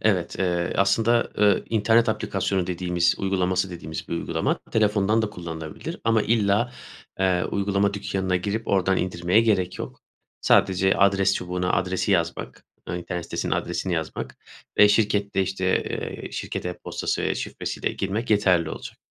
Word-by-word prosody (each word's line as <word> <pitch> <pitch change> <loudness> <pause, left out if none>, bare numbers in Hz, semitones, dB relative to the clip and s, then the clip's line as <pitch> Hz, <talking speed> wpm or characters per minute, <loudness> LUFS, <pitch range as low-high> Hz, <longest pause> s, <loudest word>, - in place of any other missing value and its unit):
Evet, 90 -5 0
eee, 85 -2 0
aslında, 115 +5 +3
ııı, 105 -2 +4
internet 115 +2 +3
aplikasyonu 95 -4 -1
dediğimiz, 90 -1 +1
uygulaması 95 -1 0
dediğimiz 80 -2 -7
bir - - -5
uygulama. 85 -1 -1
Telefondan 105 0 +2
da 110 - -2
kullanılabilir 80 -4 -7
ama 115 -1 +3
illa, 110 +1 +2 0.5
eee, 95 -2 +2
uygulama 100 0 0
dükkânına 95 -2 -1
girip 105 +5 -3
oradan 95 -1 +2
indirmeye 90 +3 +2
gerek 100 -6 +1
yok. - - -7 0.4
Sadece 95 0 +3
adres 100 0 +3
çubuğuna 90 0 -2
adresi 95 +2 0
yazmak, 85 -2 -2 0.2
eee, - - -3
internet 85 -1 -5
sitesinin - - -3
adresini 95 - -1
yazmak 80 -2 -4 0.4
ve 105 - +8
şirkette, 100 -2 +2
işte, 95 0 0
eee, - - -5
şirket - - -4
e-postası 90 - -3
ve - - 0
şifresiyle - - -3
girmek 105 +5 -3
yeterli 90 -6 +3
olacak. - - -8
95 Hz, 140 wpm, -24 LUFS, 90-105 Hz, 0.5 s, ve